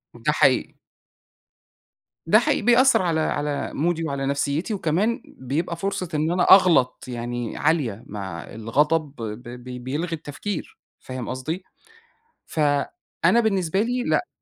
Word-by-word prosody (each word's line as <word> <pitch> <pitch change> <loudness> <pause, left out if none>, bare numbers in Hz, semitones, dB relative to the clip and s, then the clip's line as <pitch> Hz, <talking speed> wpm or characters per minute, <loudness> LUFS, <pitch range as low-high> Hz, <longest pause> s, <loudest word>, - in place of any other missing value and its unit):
ده - - 0
حقيقي. - - +2 1.5
ده - - +6
حي - - +1
بيأثّر 245 +3 +5
على 170 -3 +1
على 145 -1 -1
مودي 165 +2 0
وعلى 140 -3 -2
نفسيّتي، 140 +7 -1
وكمان 205 - 0
بيبقى 145 +7 -3
فرصة 185 -1 -3
إن 155 +2 +1
أنا 180 0 +2
أغلط 175 -10 +5
يعني 120 -1 -4
عالية 140 -9 0
مع 95 -5 -6
الغضب، 145 +7 0
ب 115 -1 -6
ب 125 +1 -8
بيلغي 155 +7 -3
التفكير، 160 +5 -6 0.2
فاهم 130 -2 -6
قصدي؟ 155 +8 -4 0.8
فأنا 150 - 0
بالنسبة 195 -3 +1
لي 245 +2 -1
لأ، 325 +5 +1
150 Hz, 125 wpm, -24 LUFS, 125-180 Hz, 1.5 s, ده